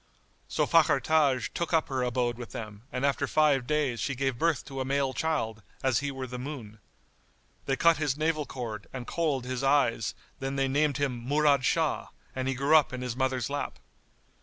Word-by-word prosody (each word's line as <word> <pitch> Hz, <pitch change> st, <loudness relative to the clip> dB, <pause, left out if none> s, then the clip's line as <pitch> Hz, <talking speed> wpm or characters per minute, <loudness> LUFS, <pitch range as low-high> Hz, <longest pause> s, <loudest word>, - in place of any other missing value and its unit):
So -, -, +1 dB
Fakhr -, -, +4 dB
Taj 145 Hz, -6 st, +2 dB
took 170 Hz, 0 st, -2 dB
up 160 Hz, -1 st, +3 dB
her 130 Hz, -1 st, -1 dB
abode 125 Hz, -1 st, 0 dB
with 120 Hz, -, -8 dB
them 105 Hz, -2 st, -7 dB
and 125 Hz, +2 st, -1 dB
after 140 Hz, 0 st, +1 dB
five 140 Hz, -4 st, +3 dB
days 145 Hz, -6 st, 0 dB
she 135 Hz, +6 st, -1 dB
gave 135 Hz, -2 st, -1 dB
birth 165 Hz, -5 st, +1 dB
to 135 Hz, -1 st, -6 dB
a -, -, +1 dB
male 135 Hz, 0 st, 0 dB
child, 130 Hz, -10 st, -1 dB, 0.2 s
as 130 Hz, -2 st, +3 dB
he 145 Hz, 0 st, -2 dB
were 135 Hz, -1 st, -5 dB
the 125 Hz, 0 st, -6 dB
moon. 125 Hz, -6 st, -7 dB, 0.9 s
They 135 Hz, -, +2 dB
cut 170 Hz, +3 st, +4 dB
his 145 Hz, -3 st, 0 dB
navel 155 Hz, -1 st, 0 dB
cord 115 Hz, -5 st, -6 dB
and 130 Hz, -2 st, -5 dB
kohl'd 145 Hz, -6 st, -1 dB
his 130 Hz, 0 st, -3 dB
eyes 135 Hz, -5 st, +2 dB, 0.2 s
then 135 Hz, +1 st, -3 dB
they 135 Hz, 0 st, +1 dB
named 145 Hz, +1 st, +1 dB
him 130 Hz, -5 st, -2 dB
Murad 145 Hz, -1 st, +3 dB
Shah, 160 Hz, 0 st, +1 dB, 0.3 s
and 130 Hz, 0 st, -2 dB
he 135 Hz, -, 0 dB
grew 140 Hz, +4 st, +3 dB
up 155 Hz, -3 st, +5 dB
in 125 Hz, 0 st, -4 dB
his 125 Hz, -2 st, -3 dB
mother's 130 Hz, -2 st, 0 dB
lap. 145 Hz, 0 st, -3 dB
135 Hz, 200 wpm, -28 LUFS, 125-145 Hz, 0.9 s, up